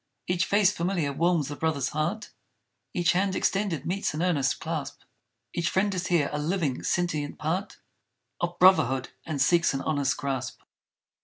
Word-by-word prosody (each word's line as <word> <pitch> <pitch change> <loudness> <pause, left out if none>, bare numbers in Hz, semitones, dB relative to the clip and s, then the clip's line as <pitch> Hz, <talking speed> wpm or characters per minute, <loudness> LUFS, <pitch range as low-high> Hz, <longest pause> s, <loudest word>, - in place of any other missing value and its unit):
Each 180 0 +1
face 200 -1 +4
familiar 170 -6 -1
warms 165 -1 +1
the 145 - -5
brother's 145 -4 -1
heart; 170 +8 -2 0.6
Each 175 -1 +2
hand 190 +1 +1
extended 195 -7 0
meets 185 -3 -1
an 160 - -1
earnest 145 -7 +1
clasp; 160 -4 -4 0.5
Each 170 0 0
friend 200 +1 +1
is 185 -1 -2
here, 170 -5 +2
a 150 - -1
living 155 -4 -1
sentient 155 -5 -1
part 180 +7 -2 0.6
Of 175 0 -2
Brotherhood 135 -9 +4 0.2
and 155 -3 -3
seeks 170 +2 +3
an 135 - -2
honest 145 -3 0
grasp! 135 -3 -4
170 Hz, 155 wpm, -27 LUFS, 145-180 Hz, 0.6 s, face